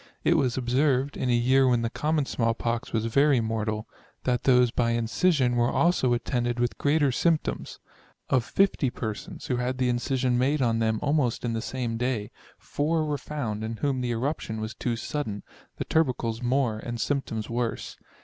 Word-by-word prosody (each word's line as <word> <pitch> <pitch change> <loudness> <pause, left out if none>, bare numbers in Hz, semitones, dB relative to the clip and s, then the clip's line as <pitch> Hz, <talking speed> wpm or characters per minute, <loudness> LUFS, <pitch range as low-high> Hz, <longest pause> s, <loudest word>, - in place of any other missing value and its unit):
It - - +4
was 125 -2 +1
observed, 130 +2 +1
in 130 - -2
a - - +3
year 130 +3 +4
when 120 -2 +2
the 115 - 0
common 150 -1 0
small 115 -3 0
pox 115 +1 -2
was 110 -1 0
very 140 +3 +3
mortal, 110 -1 -2 0.4
that 125 -1 0
those 125 -2 +5
by 115 -1 +1
incision 125 +3 +2
were 120 0 +2
also 165 -8 +2
attended 120 0 -1
with 120 0 -1
greater 145 -1 +3
symp 160 +4 +2
toms. - - -5 0.5
Of 130 - +2
50 185 -4 +2
persons, 110 -3 -6
who 125 - -1
had 125 +1 -1
the 130 -1 +1
incision 125 0 0
made 140 +4 +2
on 115 -3 +1
them 110 -1 +1
almost 145 -5 +1
in 115 - -1
the 115 - -2
same 120 -2 -3
day, 120 -4 -2 0.3
4 155 +2 -1
were 145 -2 -2
found 115 -8 -4
in 110 +1 -4
whom 135 -1 -1
the 125 - -2
eruption 120 -2 -2
was 110 +1 -4
too 120 -2 -2
sudden, 110 -3 -4 0.3
the - - -3
tubercles 125 -7 0
more, 125 -3 +1
and 120 +1 -5
symptoms 115 -6 -2
worse. 120 0 -3
125 Hz, 185 wpm, -26 LUFS, 115-135 Hz, 0.5 s, those